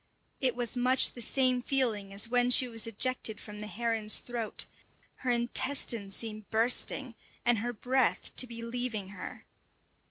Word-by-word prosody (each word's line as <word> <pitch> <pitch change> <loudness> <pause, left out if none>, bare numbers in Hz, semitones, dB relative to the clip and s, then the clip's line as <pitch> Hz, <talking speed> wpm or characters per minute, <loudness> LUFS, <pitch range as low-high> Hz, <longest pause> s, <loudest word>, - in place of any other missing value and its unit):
It 255 -2 +1
was 245 0 +1
much 250 +1 +4
the 240 - -9
same 255 +1 +1
feeling 235 -7 -1
as 200 +3 +1
when 245 +1 +1
she 250 +1 +6
was 230 -1 +1
ejected 230 -1 +1
from 210 -1 -10
the 210 - -7
heron's 225 -1 0
throat; 235 -3 0 0.5
her 255 - -5
intestines 235 -3 0
seem 215 -2 -6
bursting, 245 +3 +1 0.3
and 240 -2 +2
her 240 +3 -3
breath 250 +2 -1
to 255 - +5
be 230 -1 -9
leaving 230 -4 -4
her. 200 - -10
235 Hz, 155 wpm, -29 LUFS, 220-250 Hz, 0.5 s, she